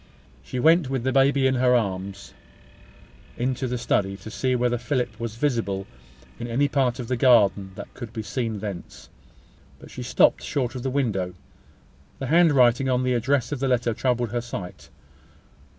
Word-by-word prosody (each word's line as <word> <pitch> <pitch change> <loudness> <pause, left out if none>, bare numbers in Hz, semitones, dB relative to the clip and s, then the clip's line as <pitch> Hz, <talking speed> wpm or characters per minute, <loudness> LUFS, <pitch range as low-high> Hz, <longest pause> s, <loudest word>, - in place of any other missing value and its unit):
She 75 - -5
went, 160 +1 +4
with 135 -3 -2
the 130 - +1
baby 135 +1 +3
in 130 - +3
her 125 -1 +3
arms, 100 -3 -3 1.0
into 130 +2 -1
the 125 0 -2
study, 100 -4 0
to 105 +3 -10
see 130 +5 0
whether 120 -1 0
Philip 120 -3 -2
was 115 -2 -4
visible 115 -8 -1 0.5
in 120 - -4
any 130 +5 +1
part 130 -3 +1
of 125 -3 -6
the 125 - 0
garden 105 -6 +3
that - - -9
could 120 -3 -8
be 110 -2 -5
seen 115 -3 -3
thence. 100 -5 -7 0.7
But - - -14
she - - -7
stopped - - +3
short 130 -5 -2
of 130 - -5
the 135 - -2
window. 105 -10 -1 0.8
The - - -5
handwriting 135 -7 +4
on 125 0 +1
the 125 0 +1
address 125 +3 0
of 145 - -3
the 135 - 0
letter 120 -2 +1
troubled 120 -1 -1
her 120 0 -1
sight. 100 -7 -8
120 Hz, 175 wpm, -24 LUFS, 110-130 Hz, 1.0 s, went